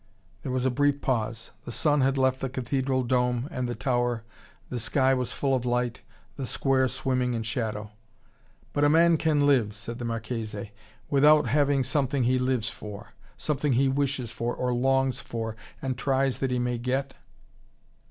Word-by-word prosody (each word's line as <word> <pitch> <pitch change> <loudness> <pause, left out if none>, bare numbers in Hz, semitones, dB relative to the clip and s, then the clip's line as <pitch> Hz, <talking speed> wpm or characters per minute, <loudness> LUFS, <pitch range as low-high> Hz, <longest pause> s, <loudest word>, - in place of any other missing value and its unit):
There 130 - -4
was 130 0 0
a 130 - +3
brief 145 +2 +2
pause. 115 -4 -2
The - - -7
sun 145 +3 +2
had 135 +1 +2
left 130 0 +2
the 135 - -2
cathedral 130 +1 -1
dome 125 +1 +1
and 125 -1 -2
the 120 - -3
tower, 120 -1 0 0.5
the 125 - -2
sky 130 +4 +2
was 125 -2 -1
full 135 -1 0
of 125 - -1
light, 120 -1 -1 0.4
the 135 -3 -3
square 130 0 +2
swimming 125 -1 -1
in 115 - -2
shadow. 110 -1 -3 0.8
"But 145 - 0
can - - +5
a 170 0 +6
man 155 -3 +2
live," 120 -8 +3
said 115 +4 -7
the 120 - -4
Marchese, 110 -2 -4 0.4
"without 150 +1 +6
having 140 +2 +2
something 135 0 0
he 130 +2 +2
lives 125 -3 0
for: 105 -2 -7 0.3
something 150 -2 0
he 135 +3 +3
wishes 135 -3 -1
for, 115 +1 -3
or 125 -1 -1
longs 135 +1 +2
for, 110 -1 -5 0.3
and 130 -1 -1
tries 135 0 0
that 135 - 0
he 125 - 0
may 125 -1 -1
get?" 135 +3 -1
130 Hz, 175 wpm, -27 LUFS, 120-135 Hz, 0.8 s, a